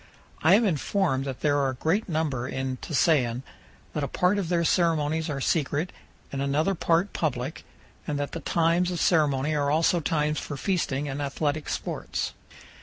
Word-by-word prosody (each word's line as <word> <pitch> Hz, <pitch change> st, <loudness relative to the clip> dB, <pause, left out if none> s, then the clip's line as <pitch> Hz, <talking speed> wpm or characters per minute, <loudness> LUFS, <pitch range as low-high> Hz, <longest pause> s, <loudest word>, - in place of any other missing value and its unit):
I 170 Hz, +5 st, +6 dB
am 225 Hz, +2 st, +4 dB
informed 160 Hz, -5 st, 0 dB
that 135 Hz, -2 st, -5 dB
there 145 Hz, -1 st, +2 dB
are 135 Hz, -1 st, +2 dB
a 130 Hz, -, -4 dB
great 180 Hz, -, 0 dB
number 150 Hz, -7 st, -1 dB
in 130 Hz, -1 st, -3 dB
Tusayan, 130 Hz, -5 st, +1 dB, 0.5 s
that 150 Hz, -, -2 dB
a -, -, 0 dB
part 180 Hz, +7 st, +2 dB
of 180 Hz, -5 st, -3 dB
their 170 Hz, -1 st, +2 dB
ceremonies 160 Hz, -2 st, +1 dB
are 140 Hz, -2 st, -2 dB
secret 150 Hz, +3 st, 0 dB, 0.4 s
and 135 Hz, -, -3 dB
another 150 Hz, +7 st, +1 dB
part 170 Hz, +2 st, +1 dB
public, 135 Hz, -2 st, -2 dB, 0.4 s
and 150 Hz, -2 st, -1 dB
that 145 Hz, 0 st, -3 dB
the 165 Hz, -, -4 dB
times 170 Hz, +2 st, +2 dB
of 175 Hz, -2 st, -3 dB
ceremony 150 Hz, -3 st, +2 dB
are 145 Hz, -1 st, +1 dB
also 165 Hz, +3 st, +3 dB
times 150 Hz, -1 st, 0 dB
for 145 Hz, -, -6 dB
feasting 150 Hz, -5 st, -1 dB
and 140 Hz, +1 st, -3 dB
athletic 145 Hz, +2 st, -2 dB
sports. -, -, -3 dB
150 Hz, 175 wpm, -26 LUFS, 140-170 Hz, 0.5 s, I